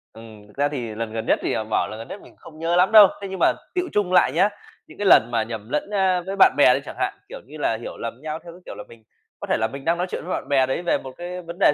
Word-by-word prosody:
Ừm. 110 -2 -13
Thực 105 - -21
ra 145 - +2
thì 120 -7 -5
lần 115 0 -4
gần 110 0 -4
nhất - - +2
thì, - - -1
à, 110 - -1
bảo 110 0 -1
lần 110 - -8
gần 115 - -8
nhất 200 - -9
mình - - -16
cũng - - -28
không 155 -1 -14
nhớ 165 +1 0
lắm 180 +4 +3
đâu. 215 -2 +10
Thế 200 - -5
nhưng 190 0 -6
mà - - +4 0.2
tựu 360 0 -1
chung 200 -3 0
lại 180 - +5
nhá, 175 +8 +3 0.4
những - - -15
cái 205 - -3
lần 120 -9 +6
mà 115 -2 +1
nhầm 110 0 -8
lẫn 150 +7 -2
á 190 -3 +1
với 195 +1 -4
bạn 195 - +6
bè 135 -3 +6
đi - - 0
chẳng - - -8
hạn. - - 0 0.2
Kiểu - - -8
như 150 - -11
là, 115 -6 0
hiểu - - -8
lầm 115 +1 -6
nhau 155 +1 -5
theo 170 - -11
cái, 180 - -16
kiểu - - -8
là, 105 - -8
mình 115 -1 -16 0.4
có - - -7
thể - - +1
là 110 - 0
mình 135 +4 -9
đang 170 +1 +1
nói 180 - -2
chuyện - - -5
với 180 - -3
bạn - - -4
bè 135 -2 +3
đấy 130 +5 -2
về 175 - +1
một 130 - -9
cái 180 +1 -6
vấn 170 0 -9
đề 170 - +5
150 Hz, 340 wpm, -22 LUFS, 115-180 Hz, 0.4 s, đâu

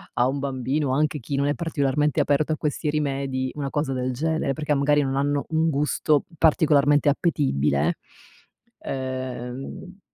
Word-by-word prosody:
a 120 - +3
un 135 +2 -2
bambino, 135 +1 -1
anche 150 +1 +1
chi 140 +3 -4
non 140 - +1
è 145 - +2
particolarmente 150 -3 0
aperto 145 +2 +2
a - - -3
questi 150 +1 -2
rimedi, 135 -3 -1
una 140 -2 -3
cosa 145 -2 -1
del 130 0 -1
genere. 160 +2 -1
Perché 150 +2 -1
magari 145 +1 +3
non 135 -1 -1
hanno 140 +1 0
un 160 0 +2
gusto 150 0 +1
particolarmente 145 -2 +4
appetibile. 80 - +1 0.8
Ehm 130 +7 -6
140 Hz, 150 wpm, -24 LUFS, 130-150 Hz, 0.8 s, particolarmente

